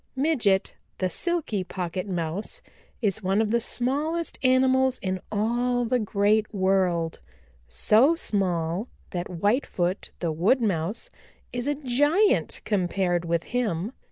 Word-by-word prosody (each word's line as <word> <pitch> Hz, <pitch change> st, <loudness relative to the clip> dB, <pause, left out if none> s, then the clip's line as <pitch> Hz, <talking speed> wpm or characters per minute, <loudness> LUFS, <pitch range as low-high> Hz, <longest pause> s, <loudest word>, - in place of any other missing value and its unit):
"Midget 245 Hz, -9 st, +2 dB, 0.2 s
the 185 Hz, -1 st, -1 dB
Silky 330 Hz, -, -1 dB
Pocket 180 Hz, +1 st, -4 dB
Mouse 185 Hz, -, -3 dB, 0.4 s
is 210 Hz, 0 st, +1 dB
one 195 Hz, +1 st, +1 dB
of 220 Hz, -1 st, +1 dB
the 235 Hz, -, +3 dB
smallest 295 Hz, +9 st, -1 dB
animals 260 Hz, 0 st, +3 dB
in 185 Hz, -1 st, -1 dB
all 240 Hz, +3 st, +1 dB
the 250 Hz, +2 st, +1 dB
Great 210 Hz, 0 st, +1 dB
World, 185 Hz, -4 st, +1 dB, 0.5 s
so 220 Hz, -, +4 dB
small 185 Hz, -, -1 dB, 0.2 s
that 175 Hz, 0 st, -3 dB
Whitefoot 185 Hz, -1 st, 0 dB
the 170 Hz, -2 st, -1 dB
Wood 185 Hz, -, +3 dB
Mouse 200 Hz, -1 st, -1 dB, 0.4 s
is 245 Hz, +2 st, -3 dB
a 290 Hz, -, +1 dB
giant 290 Hz, -, +2 dB
compared 180 Hz, -3 st, 0 dB
with 170 Hz, 0 st, 0 dB
him. 215 Hz, -5 st, -1 dB
210 Hz, 125 wpm, -26 LUFS, 180-255 Hz, 0.5 s, so